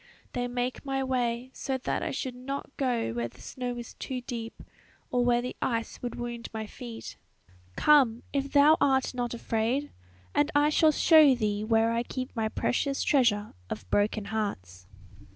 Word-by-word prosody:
They 245 0 -1
make 245 +1 -3
my 270 -1 -1
way, 250 -1 -1
so 265 -1 -2
that 260 - -2
I - - -2
should 260 -1 -3
not 275 +3 -6
go 245 - 0
where 120 0 -2
the 120 +2 -18
snow 245 - -5
is 240 -1 -8
too 260 -1 -5
deep, 230 -2 -6 0.5
or 245 -1 +2
where 240 0 +3
the 250 - -4
ice 230 -3 -2
would 245 -1 -4
wound 240 -1 -5
my 220 -1 -4
feet. 230 +1 -9 0.6
"Come! 260 -6 +4
if 280 -1 -1
thou 295 +2 +6
art 265 -1 +2
not 245 -1 -2
afraid, 235 +5 -1 0.4
and 290 +1 +2
I 290 +1 +5
shall 310 +1 +5
show 305 -3 +6
thee 210 -3 -1
where 225 +1 +3
I 230 0 +1
keep 255 +2 -5
my 220 -1 0
precious 275 +5 0
treasure 230 -7 +2 0.2
of 95 - -6
broken 205 0 +1
hearts." 90 - -4
245 Hz, 170 wpm, -28 LUFS, 225-265 Hz, 0.6 s, thou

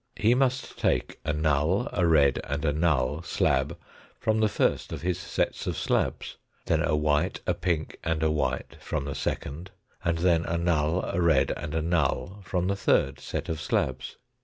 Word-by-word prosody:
He 110 +3 +3
must 130 0 0
take - - 0
a 75 - 0
null, 75 - +1
a 90 -3 +2
red, 70 -5 +4
and 70 +2 -2
a 75 - +2
null 75 -2 +1
slab 85 - 0 0.4
from 110 0 +1
the 110 -1 +3
first - - 0
of - - -5
his 90 -1 0
sets - - -2
of - - -2
slabs, - - -1 0.3
then - - +2
a - - +1
white, 75 -1 +1
a - - +2
pink, 80 -3 -2
and 80 -1 0
a 80 - +3
white 75 -3 -2
from 75 -3 -3
the 70 - -3
second, 75 +6 -4 0.3
and 85 -2 +1
then 85 -1 +3
a 85 - -1
null, 85 0 +1
a 90 - -1
red, 75 -5 +3
and 75 - -5
a 80 - 0
null 85 +4 0
from 90 -2 -1
the 100 - +1
thiid 70 -7 +2
set - - -4
of 80 -2 -3
slabs. - - -1
80 Hz, 185 wpm, -27 LUFS, 75-90 Hz, 0.4 s, red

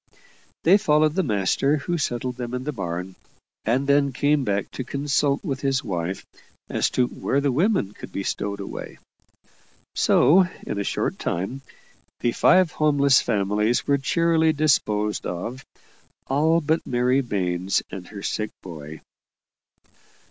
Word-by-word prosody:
They 190 +5 +6
followed 155 -5 +3
the 190 - +1
master, 135 - +1
who 170 +4 -2
settled 125 -2 -2
them 125 0 -4
in 125 - -4
the 150 - -2
barn; 90 - -5 0.5
and 125 +5 +1
then 140 0 +3
came 145 +2 +2
back 100 -4 -1
to 130 - -5
consult 140 +1 0
with 140 -7 -3
his 135 -2 0
wife 90 0 -3 0.4
as - - +1
to 125 - +4
where 135 +2 -1
the 140 -1 +1
women 165 - +1
could - - -11
be 100 - -4
stowed 100 +1 -3
away. 100 - -7 1.0
So, 185 +5 +5 0.2
in 100 - -3
a - - -1
short - - -2
time, 95 +11 -3 0.6
the 120 - +2
five 185 +6 +4
homeless 140 -3 +3
families 105 +1 0
were 140 0 +2
cheerily 160 +2 +2
disposed 105 -9 +1
of 115 +9 -5 0.6
all 160 +5 +2
but 160 +2 0
Mary 125 +2 +2
Baines 95 -5 -1
and 90 -2 -7
her 100 -2 -9
sick 105 0 -2
boy. 80 -3 -9
130 Hz, 145 wpm, -24 LUFS, 100-145 Hz, 1.0 s, They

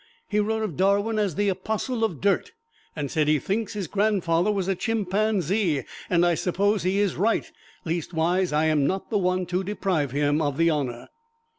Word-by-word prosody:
He 210 - 0
wrote 220 +1 0
of 195 -8 -3
Darwin 200 +4 +2
as 200 -7 0
"the 205 +2 +1
apostle 220 +5 -2
of 180 -10 -1
dirt," 205 - +1 0.4
and 145 -3 -4
said, 155 -2 +1
"He 155 0 +4
thinks 210 - -2
his 205 -3 -3
grandfather 195 -1 +1
was 195 -3 -1
a 195 - +2
chimpanzee, 200 - 0 0.3
and 175 -1 +3
I 175 - +3
suppose 200 +4 +1
he 185 +3 0
is 205 -3 +1
right 225 +5 +1 0.4
leastwise, 170 +2 0
I 150 +1 +2
am 150 -3 +2
not 190 +4 -3
the 210 - +2
one 185 0 0
to 180 +2 -1
deprive 185 -7 -1
him 145 +3 +1
of 145 -2 -1
the 165 0 +3
honor." 130 -6 -3
185 Hz, 185 wpm, -25 LUFS, 160-205 Hz, 0.4 s, He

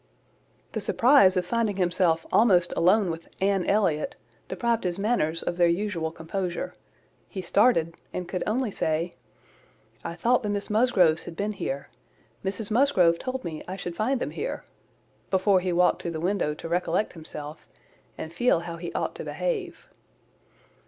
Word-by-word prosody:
The - - -3
surprise 235 -7 +5
of 180 - +1
finding 225 0 0
himself 175 -3 +2
almost 185 -6 +4
alone 185 +1 +3
with 165 0 -7
Anne 195 -2 +1
Elliot, 200 - +1 0.3
deprived 235 -1 0
his 180 -1 -1
manners 195 -7 0
of 175 - -3
their 175 -1 +5
usual 170 -2 -1
composure: 175 +2 -4 0.6
he 190 - -5
started, 175 -4 +3 0.2
and 180 -1 -4
could 180 - -3
only 230 +1 0
say, 165 0 -1 0.9
"I 170 - -5
thought 240 +8 +2
the 210 - -3
Miss 205 0 -3
Musgroves 200 -8 +3
had 170 - -8
been 205 +4 -2
here: 140 -8 -4 0.5
Mrs 205 +2 -3
Musgrove 205 -10 +4
told 255 0 -4
me 155 -2 -5
I 185 - -4
should 175 -3 -6
find 245 +7 0
them - - -3
here," - - -4 0.6
before 190 0 +3
he 180 0 -2
walked 180 +1 +3
to - - -3
the 160 -2 -4
window 175 -4 0
to 165 - -7
recollect 175 +3 0
himself, 155 -2 -9 0.5
and 160 - -6
feel 175 -2 +2
how 170 -1 -6
he 170 0 -6
ought - - -2
to - - -5
behave. 415 -8 -3
185 Hz, 160 wpm, -26 LUFS, 170-215 Hz, 0.9 s, surprise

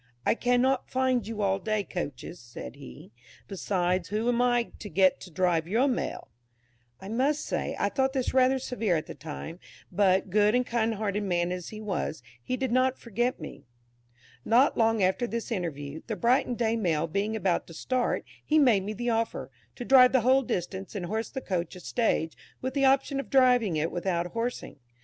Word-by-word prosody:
"I - - +4
cannot 245 +2 +1
find 255 -4 +1
you 220 -2 -3
all 195 0 +1
day 215 +1 -1
coaches," 170 -3 -6
said 115 - -10
he; 65 +10 -12 0.4
"besides, 185 -2 -1
who 215 +3 -1
am 245 0 +2
I 245 -1 +2
to 210 - -7
get 190 -1 +3
to 180 - -10
drive 170 -1 +1
your 230 +9 +2
Mail?" 255 - -3 0.7
I 190 - -10
must 275 +8 0
say, - - -2
I - - +1
thought 265 -1 0
this 260 -3 -1
rather 260 0 +4
severe 235 -7 -1
at 155 -1 -2
the - - -8
time, 160 +4 -8 0.3
but, 190 -2 +2
good 210 +2 +4
and 250 0 +2
kind 230 -2 0
hearted 205 -1 -2
man 175 -3 0
as 180 -1 -5
he 215 - -8
was, 190 - -3 0.2
he 255 - -3
did 260 -2 -2
not 255 +1 +2
forget 240 +2 -2
me. 145 -3 -10 0.8
Not 250 +5 +4
long 225 -2 +2
after 190 +6 +1
this 230 +3 -4
interview, 160 -7 -4
the 220 - -2
Brighton 245 +4 +2
Day 230 -1 0
Mail 165 -8 0
being 200 +6 -2
about 195 -5 0
to 165 - -11
start, 255 +7 -1 0.2
he 310 - +2
made 245 -9 +5
me 205 +3 -4
the 240 +2 -2
offer, 225 0 -2 0.2
to 245 - -6
drive 255 -1 +7
the 260 - +4
whole 260 +3 +4
distance 190 -3 -4
and 185 -3 -3
horse 220 +5 -3
the 265 - -5
coach 180 -4 -3
a - - -9
stage, 175 -5 0 0.2
with 260 0 -3
the 275 -1 +2
option 270 +1 +2
of 275 - -6
driving 250 -8 +4
it 160 +3 -1
without 175 -1 -1
horsing. 230 -3 -4
215 Hz, 195 wpm, -28 LUFS, 180-250 Hz, 0.8 s, drive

